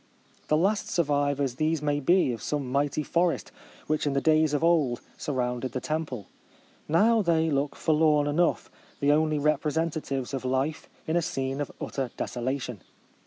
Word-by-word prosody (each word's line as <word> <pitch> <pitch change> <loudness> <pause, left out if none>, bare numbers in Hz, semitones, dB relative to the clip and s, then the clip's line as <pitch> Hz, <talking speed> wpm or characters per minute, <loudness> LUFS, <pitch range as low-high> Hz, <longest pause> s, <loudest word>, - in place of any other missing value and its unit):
The 155 - +3
last 200 +5 +1
survivors 145 -5 0
these 155 +1 +1
may 145 0 0
be 175 0 +3
of 115 - -7
some 140 -4 -3
mighty 145 +2 0
forest, 170 +3 0 0.3
which 155 -1 0
in 140 - +1
the 140 - +2
days 155 +1 +3
of 145 - -1
old 155 -8 +3 0.2
surrounded 125 -3 -2
the 130 - -1
temple. 145 - -3 0.6
JSrow 215 +7 +4
they 165 -2 +2
look 140 0 0
forlorn 155 -2 +3
enough, 160 +4 +1 0.3
the 140 0 +3
only 155 0 +2
representatives 150 -2 -1
of 135 - -3
life 130 +4 -1 0.2
in 160 - -1
a - - +3
scene 135 -3 -2
of 145 - -4
utter 135 -3 -3
desolation. 125 -3 -3
145 Hz, 160 wpm, -27 LUFS, 135-160 Hz, 0.6 s, JSrow